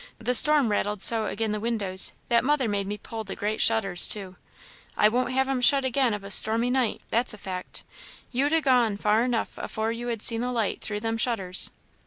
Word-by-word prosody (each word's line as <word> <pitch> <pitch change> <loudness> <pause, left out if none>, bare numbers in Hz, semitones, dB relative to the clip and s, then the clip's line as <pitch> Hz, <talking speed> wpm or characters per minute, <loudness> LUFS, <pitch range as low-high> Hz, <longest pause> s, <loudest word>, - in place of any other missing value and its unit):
the 250 - -2
storm 285 -2 +3
rattled 205 0 -2
so 220 +2 +2
agin' 220 +1 -3
the 210 - -3
windows, 205 -4 +3 0.2
that 235 0 +1
mother 280 -2 0
made 200 -2 -3
me 205 +1 -5
pull 220 +2 -8
the 200 - -8
great 210 +1 -3
shutters 195 -6 +5
to. 190 -3 -2 0.6
I 210 - +4
won't 245 +3 -1
have 265 +1 0
'em 270 -2 -2
shut 275 +2 +3
again 255 -3 0
of 205 - -10
a 200 - -8
stormy 225 +4 +4
night, 255 -4 -1
that's 235 -1 0
a - - -16
fact; 185 -2 -8 0.5
you'd 275 +4 -1
ha' 325 -1 +1
gone 245 -6 +1
far 210 +2 +1
enough 240 -2 -3
afore 220 +1 -4
you'd 235 0 -5
ha' - - -10
seen 230 -1 +2
the 250 +1 -3
light 225 -5 -3
through 210 -1 -4
them 225 0 -3
shutters." 195 -7 +2
225 Hz, 215 wpm, -24 LUFS, 210-250 Hz, 0.6 s, shutters